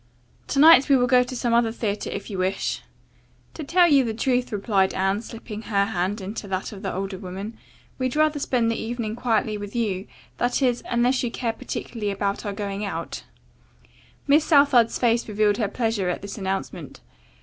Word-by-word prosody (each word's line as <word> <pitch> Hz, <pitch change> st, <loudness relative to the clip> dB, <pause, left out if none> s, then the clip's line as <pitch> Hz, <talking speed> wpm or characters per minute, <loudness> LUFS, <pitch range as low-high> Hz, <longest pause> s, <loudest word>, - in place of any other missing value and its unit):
To -, -, -3 dB
night 295 Hz, -2 st, +7 dB
we 275 Hz, -, +6 dB
will 245 Hz, -, +3 dB
go 250 Hz, 0 st, +5 dB
to 250 Hz, +1 st, -4 dB
some 240 Hz, -1 st, 0 dB
other 235 Hz, -1 st, +3 dB
theatre 215 Hz, -3 st, -3 dB
if -, -, -5 dB
you 190 Hz, -, -4 dB
wish." 190 Hz, +1 st, -1 dB, 0.7 s
"To 320 Hz, -, -6 dB
tell 350 Hz, +4 st, +4 dB
you 280 Hz, -4 st, +5 dB
the 225 Hz, -2 st, -3 dB
truth," 250 Hz, +1 st, 0 dB
replied 200 Hz, -2 st, +1 dB
Anne, 195 Hz, +2 st, 0 dB
slipping 225 Hz, -2 st, -8 dB
her 200 Hz, -2 st, +1 dB
hand 200 Hz, +1 st, -2 dB
into 200 Hz, +2 st, -6 dB
that 190 Hz, -1 st, -3 dB
of 200 Hz, -3 st, -9 dB
the 195 Hz, -, -3 dB
older 190 Hz, 0 st, -4 dB
woman, 195 Hz, +4 st, -7 dB, 0.4 s
"we'd 255 Hz, 0 st, -1 dB
rather 305 Hz, -1 st, +2 dB
spend 240 Hz, -4 st, +1 dB
the 230 Hz, -, -3 dB
evening 225 Hz, -1 st, -3 dB
quietly 220 Hz, -3 st, 0 dB
with 205 Hz, +1 st, -8 dB
you. 205 Hz, -5 st, -1 dB, 0.3 s
That 245 Hz, 0 st, +1 dB
is, 245 Hz, -2 st, +2 dB
unless 245 Hz, +2 st, +2 dB
you 245 Hz, -, -1 dB
care 230 Hz, -1 st, -2 dB
particularly 220 Hz, -1 st, -5 dB
about 200 Hz, +1 st, -2 dB
our 200 Hz, -, -2 dB
going 200 Hz, 0 st, -4 dB
out." 200 Hz, -, -5 dB, 1.0 s
Miss 290 Hz, +2 st, +4 dB
Southard's 280 Hz, -7 st, +4 dB
face 235 Hz, -1 st, +1 dB
revealed 210 Hz, -1 st, +2 dB
her 220 Hz, -, 0 dB
pleasure 220 Hz, -3 st, -1 dB
at 180 Hz, -, -3 dB
this 200 Hz, -, -6 dB
announcement. 195 Hz, -, -5 dB
225 Hz, 190 wpm, -24 LUFS, 200-245 Hz, 1.0 s, night